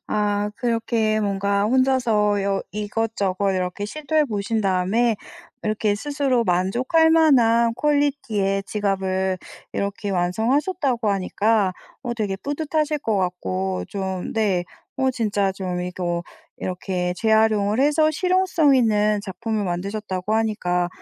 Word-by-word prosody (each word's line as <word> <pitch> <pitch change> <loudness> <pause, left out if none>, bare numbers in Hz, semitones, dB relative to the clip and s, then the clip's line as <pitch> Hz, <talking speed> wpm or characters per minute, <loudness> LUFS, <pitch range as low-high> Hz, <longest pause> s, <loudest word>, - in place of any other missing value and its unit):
아 205 0 0
그렇게 230 -2 0
뭔가 200 0 0
혼자서 230 -4 +2
여 195 -1 0
이것저것 205 -2 -1
이렇게 185 +2 -2
시도해 305 +5 0
보신 215 -1 -2
다음에 200 +5 +1 0.5
이렇게 215 -1 +1
스스로 275 -2 0
만족할 240 - +2
만한 235 -8 +4
퀄리티의 255 -9 0
지갑을 190 -2 -1 0.3
이렇게 200 +1 -3
완성하셨다고 235 - 0
하니까 200 +1 +1 0.3
어 240 -3 -3
되게 205 -4 -2
뿌듯하실 300 +3 -1
것 220 -6 0
같고 95 - -2
좀 190 -2 -4
네 200 -5 +1 0.3
어 265 0 +2
진짜 205 -5 0
좀 180 -2 -3
이거 175 -1 -3 0.3
이렇게 180 -1 -3
재활용을 220 0 +3
해서 310 +2 +3
실용성 360 -4 +2
있는 210 -4 +2
작품을 215 +2 -3
만드셨다고 195 +2 -3
하니까 180 -6 0
210 Hz, 280 characters per minute, -22 LUFS, 190-240 Hz, 0.5 s, 만한